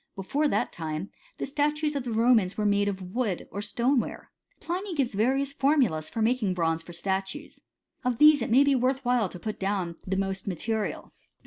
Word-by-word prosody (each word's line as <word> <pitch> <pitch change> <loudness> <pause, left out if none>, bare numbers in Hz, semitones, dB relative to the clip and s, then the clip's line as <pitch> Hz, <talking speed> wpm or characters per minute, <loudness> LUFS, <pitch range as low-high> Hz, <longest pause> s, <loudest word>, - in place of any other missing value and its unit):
Before 275 +11 0
that - - 0
time, 160 +2 -5 0.3
the - - -3
statues 295 +2 0
of 275 -3 -2
the 240 - -3
Romans 225 -4 +3
were 210 - 0
made 205 0 +2
of 190 -2 -4
wood 230 -8 -1
or 200 - -4
stoneware. 240 +4 -1 0.3
Pliny 365 +2 -4
gives 270 -6 0
various 265 +7 +1
formulas 265 - +2
for 225 - -2
making 225 -5 +1
bronze 165 -2 0
for 170 - -12
statues. 195 - -3 0.4
Of 250 -2 0
these 300 -1 +7
it 230 - -2
may 255 +5 +6
be 280 0 +3
worth 260 +1 0
while 245 -5 +2
to 180 - -9
put 215 +3 -5
down 190 -3 -1
the 190 +1 -1
most 195 0 -2
material. 210 +4 -3
225 Hz, 190 wpm, -27 LUFS, 190-270 Hz, 0.4 s, these